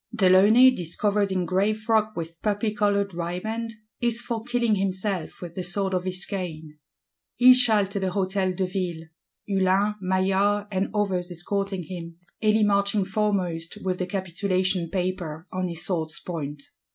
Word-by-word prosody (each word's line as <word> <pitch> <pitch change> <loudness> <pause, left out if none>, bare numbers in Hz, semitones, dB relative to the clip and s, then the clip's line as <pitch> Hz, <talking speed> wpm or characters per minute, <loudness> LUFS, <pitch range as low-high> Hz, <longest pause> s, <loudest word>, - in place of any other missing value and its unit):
De 220 -5 +2
Launay, 220 +7 +7
"discovered 200 +1 0
in 185 -1 0
gray 195 +4 +2
frock 215 0 0
with 165 0 -6
poppy 210 0 0
coloured 200 -2 +1
riband," 215 +7 -3 0.3
is 235 -1 0
for 235 -2 -3
killing 240 -2 +1
himself 190 -2 -2
with 170 -1 -7
the 185 - -4
sword 190 +2 0
of 180 0 -1
his 185 0 0
cane. 160 -6 -6 0.6
He 250 +3 +8
shall 225 -5 +4
to 200 +1 -4
the 190 - -1
Hôtel 190 0 0
de 190 - +1
Ville; 180 -3 -3 0.4
Hulin 195 +1 +2
Maillard 195 +2 +1
and 190 0 0
others 190 -4 0
escorting 195 +2 -3
him; 170 0 -8 0.2
Elie 215 0 +3
marching 200 -1 +2
foremost 190 -5 -1
"with 185 -1 -1
the 180 - -1
capitulation 185 -1 -1
paper 180 -4 -3
on 185 0 -2
his 170 -1 -5
sword's 160 -4 -3
point." 145 -4 -6
190 Hz, 155 wpm, -25 LUFS, 180-205 Hz, 0.6 s, He